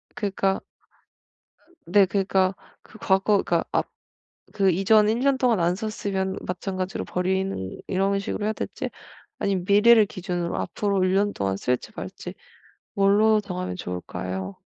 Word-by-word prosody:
그니까 195 Hz, -4 st, 0 dB, 1.2 s
네 195 Hz, +3 st, +5 dB
그니까 190 Hz, -1 st, +1 dB, 0.3 s
그 220 Hz, -, -16 dB
과거 195 Hz, +2 st, +2 dB
그니까 170 Hz, -1 st, +1 dB
앞 -, -, 0 dB, 0.6 s
그 195 Hz, -2 st, +3 dB
이전 210 Hz, +4 st, +4 dB
1 225 Hz, +2 st, +1 dB
년 275 Hz, 0 st, +2 dB
동안 245 Hz, -5 st, +2 dB
안 175 Hz, +1 st, +2 dB
썼으면 195 Hz, -2 st, -3 dB
마찬가지로 185 Hz, +1 st, -3 dB
버리는 185 Hz, -, -2 dB
이런 195 Hz, +1 st, +1 dB
식으로 200 Hz, +1 st, -3 dB
해야 215 Hz, -, +1 dB
될지 -, -, -5 dB, 0.5 s
아니면 195 Hz, -3 st, -1 dB
미래를 215 Hz, +3 st, +6 dB
기준으로 175 Hz, -3 st, -3 dB
앞으로 200 Hz, -2 st, -1 dB
1 185 Hz, 0 st, +2 dB
년동안 195 Hz, -, 0 dB
쓸지 125 Hz, +5 st, -2 dB
말지 -, -, -7 dB, 0.6 s
뭘로 210 Hz, +2 st, +4 dB
정하면 180 Hz, -, -5 dB
좋을까요? 95 Hz, +1 st, -5 dB
195 Hz, 285 characters per minute, -24 LUFS, 180-205 Hz, 1.2 s, 미래를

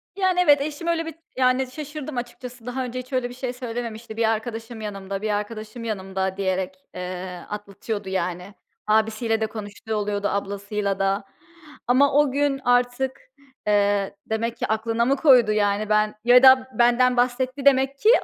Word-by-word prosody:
Yani, 375 Hz, -2 st, +1 dB
evet, 290 Hz, -3 st, +5 dB
eşim 305 Hz, +3 st, -4 dB
öyle 330 Hz, -1 st, +1 dB
bir, 325 Hz, -1 st, -7 dB, 0.2 s
yani, 255 Hz, 0 st, +3 dB
şaşırdım 295 Hz, -1 st, -6 dB
açıkçası. 245 Hz, 0 st, -7 dB
Daha 255 Hz, +1 st, -3 dB
önce 250 Hz, +1 st, -5 dB
hiç 255 Hz, +2 st, -10 dB
öyle 250 Hz, -1 st, 0 dB
bir -, -, -9 dB
şey 250 Hz, -1 st, -4 dB
söylememişti. 230 Hz, -2 st, -6 dB
"Bir 225 Hz, -1 st, +2 dB
arkadaşım 225 Hz, 0 st, -4 dB
yanımda, 195 Hz, -1 st, -5 dB
bir 215 Hz, -, -2 dB
arkadaşım 215 Hz, +2 st, -4 dB
yanımda." 190 Hz, -3 st, -3 dB
diyerek, 190 Hz, -1 st, -1 dB, 0.2 s
eee, 180 Hz, 0 st, -6 dB
atlatıyordu, 205 Hz, 0 st, -5 dB
yani. 180 Hz, +1 st, -3 dB, 0.3 s
Abisiyle 220 Hz, +1 st, +1 dB
de 220 Hz, -, +1 dB
konuştuğu 215 Hz, 0 st, -6 dB
oluyordu, 205 Hz, -1 st, -1 dB
ablasıyla 200 Hz, 0 st, -2 dB
da 195 Hz, +1 st, +1 dB, 0.6 s
ama 270 Hz, +3 st, +4 dB
o 290 Hz, -2 st, +4 dB
gün 280 Hz, 0 st, +1 dB
artık, 245 Hz, -, +1 dB, 0.5 s
eee, 205 Hz, -1 st, +2 dB
demek 230 Hz, +1 st, -2 dB
ki -, -, -2 dB
aklına 225 Hz, +2 st, 0 dB
mı 275 Hz, +2 st, +3 dB
koydu? 255 Hz, -6 st, +5 dB
Yani, 210 Hz, 0 st, +1 dB
ben 215 Hz, 0 st, +2 dB
Ya 250 Hz, +2 st, +6 dB
da 260 Hz, 0 st, +7 dB
benden 245 Hz, +1 st, +4 dB
bahsetti 255 Hz, +2 st, 0 dB
demek 270 Hz, 0 st, +4 dB
ki 435 Hz, -, +4 dB
230 Hz, 160 wpm, -24 LUFS, 205-255 Hz, 0.6 s, da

